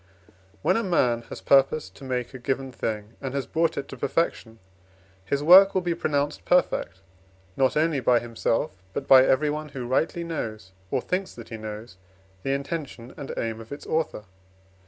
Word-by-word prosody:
When -, -, +3 dB
a 230 Hz, -, 0 dB
man 125 Hz, -, +2 dB
has -, -, -8 dB
purposed 135 Hz, -6 st, +3 dB
to -, -, -12 dB
make 125 Hz, -2 st, -3 dB
a 130 Hz, -, -8 dB
given 135 Hz, +1 st, -2 dB
thing, 110 Hz, -2 st, -4 dB
and 135 Hz, -1 st, -4 dB
has 135 Hz, -2 st, -1 dB
brought 165 Hz, +3 st, 0 dB
it 140 Hz, -, -3 dB
to 135 Hz, -, -8 dB
perfection, 120 Hz, -6 st, -1 dB, 0.7 s
his 140 Hz, +9 st, -1 dB
work 190 Hz, +5 st, +8 dB
will 185 Hz, -, +3 dB
be 175 Hz, -1 st, 0 dB
pronounced 145 Hz, -3 st, -1 dB
perfect, -, -, +1 dB, 0.5 s
not 130 Hz, +1 st, +2 dB
only 155 Hz, -2 st, +2 dB
by 125 Hz, -1 st, +4 dB
himself, 115 Hz, -, -2 dB
but 135 Hz, -, -4 dB
by 130 Hz, -1 st, +9 dB
everyone 150 Hz, +3 st, +1 dB
who 135 Hz, -4 st, -6 dB
rightly 160 Hz, +6 st, 0 dB
knows, 110 Hz, -, -5 dB, 0.2 s
or -, -, 0 dB
thinks 185 Hz, +1 st, -2 dB
that 115 Hz, -2 st, -11 dB
he 115 Hz, -, -6 dB
knows, 110 Hz, -1 st, -8 dB, 0.4 s
the 135 Hz, -, -2 dB
intention 140 Hz, -3 st, -4 dB
and 140 Hz, -, -7 dB
aim 115 Hz, 0 st, -3 dB
of 115 Hz, -, -14 dB
its 145 Hz, -, -7 dB
author. 155 Hz, -9 st, -1 dB
135 Hz, 175 wpm, -25 LUFS, 115-155 Hz, 0.7 s, by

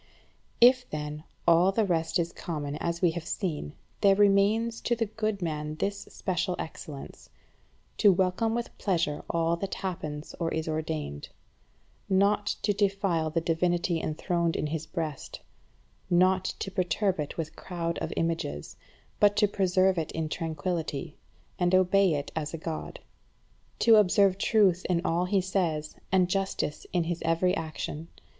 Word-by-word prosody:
If, 250 Hz, +1 st, +6 dB
then, 150 Hz, +1 st, -5 dB, 0.2 s
all 170 Hz, +3 st, +6 dB
the 215 Hz, +2 st, +1 dB
rest 165 Hz, -3 st, 0 dB
is 170 Hz, -1 st, -1 dB
common 145 Hz, -4 st, -4 dB
as 170 Hz, +2 st, -3 dB
we 175 Hz, -, +5 dB
have 170 Hz, 0 st, -6 dB
seen, 155 Hz, -5 st, -3 dB, 0.3 s
there 200 Hz, -2 st, +6 dB
remains 205 Hz, +3 st, +3 dB
to 240 Hz, -, +1 dB
the 230 Hz, -1 st, 0 dB
good 215 Hz, -2 st, -2 dB
man 150 Hz, -2 st, -3 dB
this 200 Hz, +5 st, -3 dB
special 185 Hz, 0 st, -2 dB
excellence; 150 Hz, -3 st, -8 dB, 0.7 s
to 205 Hz, -, +6 dB
welcome 190 Hz, +5 st, +1 dB
with 235 Hz, 0 st, -4 dB
pleasure 170 Hz, -6 st, 0 dB
all 165 Hz, 0 st, +1 dB
that 195 Hz, +2 st, -4 dB
happens 155 Hz, -5 st, -5 dB
or 165 Hz, -1 st, -1 dB
is 160 Hz, 0 st, -2 dB
ordained, 155 Hz, -, -3 dB, 0.8 s
not 200 Hz, +2 st, +3 dB, 0.2 s
to 205 Hz, -, +2 dB
defile 195 Hz, -5 st, +1 dB
the 165 Hz, +2 st, 0 dB
divinity 170 Hz, 0 st, +1 dB
enthroned 170 Hz, +2 st, -1 dB
in -, -, -1 dB
his 160 Hz, +1 st, -3 dB
breast, 155 Hz, -3 st, -5 dB, 0.7 s
not 185 Hz, +1 st, +3 dB
to 195 Hz, -, -4 dB
perturb 185 Hz, 0 st, 0 dB
it 145 Hz, -1 st, -4 dB
with 160 Hz, -2 st, -2 dB
a -, -, -16 dB
crowd 170 Hz, -2 st, -3 dB
of -, -, -3 dB
images, 165 Hz, -, -2 dB, 0.4 s
but 205 Hz, 0 st, +5 dB
to 210 Hz, -, +5 dB
preserve 190 Hz, -2 st, +2 dB
it 160 Hz, -, -3 dB
in 160 Hz, -1 st, -2 dB
tranquillity, 160 Hz, -2 st, -3 dB, 0.4 s
and 180 Hz, 0 st, +3 dB
obey 185 Hz, -1 st, +4 dB
it 145 Hz, 0 st, -4 dB
as 155 Hz, 0 st, -3 dB
a -, -, -5 dB
God: 160 Hz, 0 st, -6 dB, 0.8 s
to 225 Hz, -2 st, +6 dB
observe 195 Hz, -1 st, +4 dB
truth 195 Hz, -5 st, +3 dB
in 175 Hz, -1 st, +1 dB
all 170 Hz, +2 st, +1 dB
he 195 Hz, +1 st, +2 dB
says, 170 Hz, -5 st, -1 dB, 0.2 s
and 185 Hz, -1 st, +4 dB
justice 190 Hz, -5 st, -2 dB
in 175 Hz, -3 st, +1 dB
his 170 Hz, 0 st, -3 dB
every 165 Hz, +3 st, +2 dB
action. 160 Hz, -1 st, -5 dB
175 Hz, 155 wpm, -28 LUFS, 160-195 Hz, 0.8 s, If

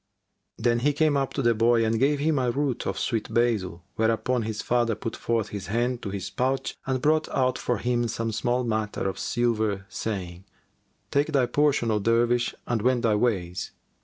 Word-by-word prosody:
"[FN#386] -, -, -11 dB
Then 120 Hz, 0 st, +3 dB
he 145 Hz, +4 st, +2 dB
came 150 Hz, 0 st, +2 dB
up 135 Hz, -1 st, 0 dB
to 140 Hz, -, -1 dB
the 120 Hz, 0 st, +4 dB
boy 115 Hz, +1 st, +3 dB
and 110 Hz, 0 st, +1 dB
gave 145 Hz, +2 st, +3 dB
him 150 Hz, 0 st, +1 dB
a 125 Hz, -2 st, +1 dB
root[FN#387] 135 Hz, 0 st, -1 dB
of -, -, -2 dB
sweet 115 Hz, -3 st, -2 dB
basil, 105 Hz, -8 st, 0 dB
whereupon 115 Hz, +2 st, +1 dB
his 110 Hz, -1 st, -4 dB
father 120 Hz, -2 st, +1 dB
put 115 Hz, -, -5 dB
forth 115 Hz, -2 st, -1 dB
his 100 Hz, -2 st, -6 dB
hand 120 Hz, +3 st, 0 dB
to 100 Hz, -, -4 dB
his 100 Hz, -1 st, -5 dB
pouch 130 Hz, +1 st, -1 dB
and 130 Hz, -1 st, 0 dB
brought 155 Hz, +1 st, +2 dB
out 130 Hz, -1 st, +1 dB
for 120 Hz, -, 0 dB
him 120 Hz, +1 st, 0 dB
some 115 Hz, 0 st, -2 dB
small 120 Hz, +3 st, 0 dB
matter 110 Hz, -4 st, -1 dB
of 95 Hz, -, -4 dB
silver, 110 Hz, -5 st, 0 dB
saying, 95 Hz, -4 st, -4 dB, 0.7 s
"Take 140 Hz, +1 st, +2 dB
thy 135 Hz, -4 st, +3 dB
portion, 140 Hz, -2 st, +2 dB
O 105 Hz, -, +2 dB
Dervish, 120 Hz, +3 st, +2 dB
and 120 Hz, -3 st, -1 dB
wend 125 Hz, +1 st, +2 dB
thy 115 Hz, -2 st, +3 dB
ways." 95 Hz, -6 st, -1 dB
120 Hz, 195 wpm, -26 LUFS, 110-125 Hz, 0.7 s, the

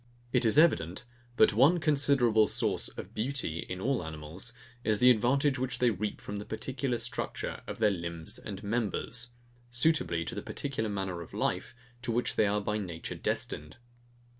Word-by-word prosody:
It -, -, +3 dB
is 115 Hz, +5 st, +4 dB
evident, 120 Hz, -, +4 dB, 0.3 s
that -, -, +6 dB
one 170 Hz, +5 st, +5 dB
considerable 135 Hz, -8 st, +4 dB
source -, -, 0 dB
of -, -, -8 dB
BEAUTY 110 Hz, -, -2 dB
in 90 Hz, -, -4 dB
all 125 Hz, +1 st, 0 dB
animals 80 Hz, +7 st, -5 dB, 0.3 s
is 110 Hz, -1 st, +2 dB
the 125 Hz, +3 st, +7 dB
advantage 130 Hz, +4 st, +2 dB
which 125 Hz, -2 st, -1 dB
they 125 Hz, -1 st, +4 dB
reap 105 Hz, +1 st, -3 dB
from 100 Hz, -, -6 dB
the 105 Hz, -, -5 dB
particular 125 Hz, +3 st, -2 dB
structure -, -, -3 dB
of -, -, -5 dB
their 105 Hz, -2 st, +4 dB
limbs 85 Hz, -3 st, -5 dB
and 100 Hz, -2 st, -7 dB
members, 120 Hz, +2 st, -1 dB, 0.4 s
suitably 120 Hz, -, +1 dB
to -, -, -4 dB
the -, -, -4 dB
particular 130 Hz, -6 st, -3 dB
manner 95 Hz, -4 st, -3 dB
of 85 Hz, -, -10 dB
life, -, -, -1 dB, 0.3 s
to 125 Hz, -1 st, -2 dB
which 120 Hz, +2 st, 0 dB
they 105 Hz, -, +4 dB
are 105 Hz, +1 st, +1 dB
by 105 Hz, +1 st, -1 dB
nature 85 Hz, -5 st, -5 dB
destined. 75 Hz, +5 st, -3 dB
110 Hz, 170 wpm, -31 LUFS, 95-125 Hz, 0.4 s, the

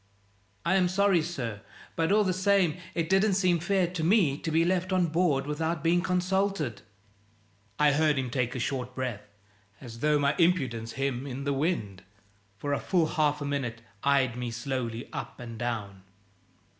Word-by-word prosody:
"I 190 Hz, +3 st, +3 dB
am 180 Hz, -1 st, +3 dB
sorry, 195 Hz, -2 st, +3 dB
sir; 125 Hz, -11 st, -4 dB, 0.3 s
but 165 Hz, +2 st, +1 dB
all 210 Hz, +1 st, +5 dB
the 185 Hz, -2 st, +1 dB
same, 185 Hz, -3 st, +2 dB, 0.2 s
it 165 Hz, -2 st, 0 dB
didn't 195 Hz, +2 st, +3 dB
seem 180 Hz, -3 st, +2 dB
fair 190 Hz, +2 st, +1 dB
to 175 Hz, -1 st, -4 dB
me 170 Hz, -5 st, +4 dB
to -, -, -3 dB
be 165 Hz, +1 st, +3 dB
left 185 Hz, +1 st, 0 dB
on 185 Hz, -1 st, +3 dB
board 160 Hz, -4 st, +1 dB
without 160 Hz, +3 st, -2 dB
being 170 Hz, +1 st, +3 dB
consulted." 180 Hz, -, 0 dB, 1.0 s
I 150 Hz, 0 st, +4 dB
heard 150 Hz, 0 st, +2 dB
him 130 Hz, -2 st, -2 dB
take 125 Hz, -1 st, -1 dB
a -, -, -2 dB
short 125 Hz, 0 st, -3 dB
breath, 125 Hz, -5 st, -3 dB, 0.6 s
as 115 Hz, -3 st, -10 dB
though 150 Hz, +2 st, +3 dB
my 140 Hz, 0 st, +2 dB
impudence 130 Hz, -10 st, +1 dB
him 135 Hz, -1 st, -2 dB
in 135 Hz, +1 st, -5 dB
the 140 Hz, 0 st, 0 dB
wind. 135 Hz, -, -1 dB, 0.6 s
For 145 Hz, +7 st, -2 dB
a 140 Hz, -, 0 dB
full 175 Hz, -4 st, +1 dB
half 150 Hz, -1 st, +1 dB
a -, -, -2 dB
minute 125 Hz, -5 st, -3 dB, 0.2 s
eyed 135 Hz, -4 st, +2 dB
me 125 Hz, -1 st, -3 dB
slowly 120 Hz, 0 st, -4 dB
up -, -, -6 dB
and 115 Hz, -2 st, -8 dB
down. 105 Hz, -5 st, -4 dB
150 Hz, 175 wpm, -28 LUFS, 125-180 Hz, 1.0 s, all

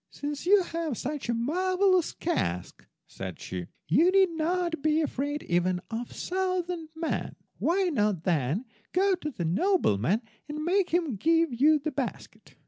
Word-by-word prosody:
"Since 290 Hz, +3 st, -5 dB
you 400 Hz, 0 st, +6 dB
have 330 Hz, -7 st, -3 dB
such 285 Hz, -2 st, -4 dB
a -, -, +3 dB
marvellous 365 Hz, +7 st, +2 dB
cask," 90 Hz, -, -3 dB, 0.2 s
said 95 Hz, -3 st, -7 dB
she, 90 Hz, -2 st, -5 dB, 0.2 s
"you 300 Hz, -, +5 dB
need 380 Hz, -2 st, +4 dB
not 335 Hz, 0 st, -1 dB
be 310 Hz, +1 st, +2 dB
afraid 290 Hz, -1 st, -2 dB
even 180 Hz, +1 st, +1 dB
of 230 Hz, +2 st, -3 dB
a -, -, -13 dB
thousand 360 Hz, -3 st, -2 dB
men. 320 Hz, 0 st, -3 dB, 0.2 s
Why 380 Hz, +4 st, +2 dB
not 210 Hz, -, +1 dB
then 165 Hz, -, 0 dB, 0.3 s
go 385 Hz, +2 st, +3 dB
to 345 Hz, -4 st, -3 dB
the 185 Hz, -, -4 dB
nobleman 195 Hz, -, +2 dB, 0.3 s
and 305 Hz, +1 st, -4 dB
make 375 Hz, +1 st, +2 dB
him 325 Hz, -, 0 dB
give 330 Hz, -, +2 dB
you 300 Hz, +6 st, +5 dB
the 300 Hz, +1 st, -3 dB
basket." -, -, -6 dB
310 Hz, 155 wpm, -28 LUFS, 225-355 Hz, 0.3 s, you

